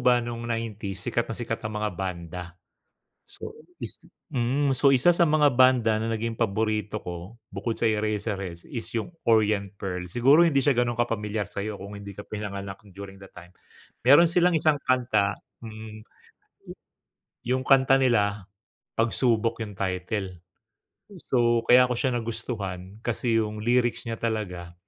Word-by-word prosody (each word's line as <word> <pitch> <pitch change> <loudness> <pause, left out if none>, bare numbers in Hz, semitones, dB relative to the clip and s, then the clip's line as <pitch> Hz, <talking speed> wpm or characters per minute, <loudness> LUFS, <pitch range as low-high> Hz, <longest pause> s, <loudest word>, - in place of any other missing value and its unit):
ba 125 -1 +5
nung 120 0 -5
'90s 105 -4 -4
sikat 120 - -1
na - - -2
sikat 115 -2 -4
ang 110 -1 -4
mga 105 0 -1
banda. 90 -1 -5 0.8
So 445 - -8 0.3
is - - -4 0.3
mm, 135 +3 +1
so 140 +1 +5
isa 130 +5 +4
sa 170 - +3
mga 150 -3 +3
banda 125 -4 +5
na 115 - -2
naging 115 +1 -2
paborito 110 -1 -1
ko 90 +6 -8 0.2
bukod 110 +4 -2
sa 115 - +1
Eraserheads 105 -5 -2
is 115 -3 -5
'yung 110 - -4 0.2
Orient 105 -3 +3
Pearl. 90 -2 -3
Siguro 135 - +5
hindi 155 -5 +3
siya 140 +1 +3
gano'n 120 -1 0
kapamilyar 110 -3 -1
sa'yo 100 +1 -5
kung 100 +2 -8
hindi 100 -1 -8
ka 105 - -8
pinanganak 100 -2 -6
during 95 +1 -9
the 95 - -12
time. 90 0 -12 0.6
Meron 145 +7 +8
silang 180 +1 +4
isang 155 -1 +3
kanta, 110 -6 +1 0.3
hmm, 110 -1 -9 1.5
'yung 130 +1 +1
kanta 135 -1 +5
nila 105 -6 +1 0.5
Pagsubok 115 0 +1
'yung 105 -3 -7
title. 95 0 -3 0.8
So 120 -6 +2
kaya 125 +1 +7
ko - - +1
siya 130 +1 0
nagustuhan 100 -4 -5
kasi 120 -1 0
'yung 105 -1 -4
lyrics 120 +1 +1
niya 115 -1 -4
talaga 90 -7 -3
110 Hz, 150 wpm, -26 LUFS, 100-120 Hz, 1.5 s, Meron